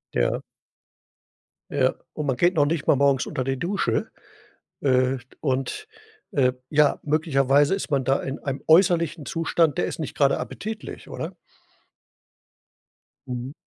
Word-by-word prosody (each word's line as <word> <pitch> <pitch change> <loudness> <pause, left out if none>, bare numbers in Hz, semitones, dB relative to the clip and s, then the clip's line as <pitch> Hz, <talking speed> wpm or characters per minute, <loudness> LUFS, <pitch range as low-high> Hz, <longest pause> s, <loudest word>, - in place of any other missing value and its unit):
Ja. - - +1 1.3
Ja, 130 -2 +2 0.2
und 150 - -4
man 135 -3 +1
geht 175 +2 +3
noch 145 -3 +4
nicht 155 0 -2
mal - - +6
morgens 140 -2 +3
unter 130 - -3
die 135 +1 -1
Dusche. 185 +8 -1 0.7
Äh, 130 -1 +2 0.2
und, 135 - -2 0.4
äh, 130 -3 +3 0.2
ja, 150 -1 +3
möglicherweise 145 -1 +3
ist 195 - -5
man 135 -2 +2
da 135 +2 +2
in 135 +1 -5
einem 140 -1 -4
äußerlichen 170 -2 +4
Zustand, 165 +1 +1
der - - +1
ist - - -5
nicht 155 - -5
gerade 140 -1 +3
appetitlich, 220 +1 -6
oder? - - -5 1.9
Mhm. 125 +2 -5
145 Hz, 135 wpm, -24 LUFS, 135-165 Hz, 1.9 s, mal